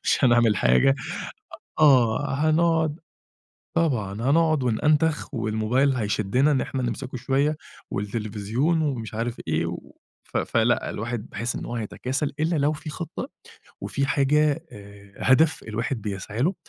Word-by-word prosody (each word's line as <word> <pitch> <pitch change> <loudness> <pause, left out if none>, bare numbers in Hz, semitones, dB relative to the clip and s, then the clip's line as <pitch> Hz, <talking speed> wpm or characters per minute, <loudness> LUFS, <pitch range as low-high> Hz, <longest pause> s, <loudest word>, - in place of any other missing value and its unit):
مش - - +2
هنعمل 120 -4 +4
حاجة، 65 - +4 0.9
أ - - +1
آه، 130 -2 +4
هنقعُد 160 +1 +2 0.8
طبعًا، 125 -13 +1
هنقعُد 145 +6 +2
ونأنتخ، 150 +6 +1
والموبايل 115 +5 +1
هيشدّنا 110 +5 +1
إن 135 -3 +2
إحنا 130 -1 -3
نمسكه 125 +2 -4
شوية 135 +5 +1 0.3
والتلفزيون 110 +9 -1
ومش 120 -8 -3
عارف 115 +2 -2
إيه، 80 +1 +1
و 85 +1 -7 0.3
ف - - -7
فلأ - - +1
الواحد 115 0 -4
باحس 120 +1 -3
إن - - -5
هو 120 - -5
هيتكاسل، 130 +5 -3
إلّا 165 +1 +1
لو 145 +1 +2
في 155 0 -7
خطّة، 175 - -6 0.5
وفي 140 0 -2
حاجة 145 +2 +2
آآ 100 -1 -13
هدف 145 +3 +3
الواحد 115 +2 -3
بيسعى 105 +2 -5
له، 180 +7 +2
130 Hz, 135 wpm, -24 LUFS, 110-150 Hz, 0.9 s, هنعمل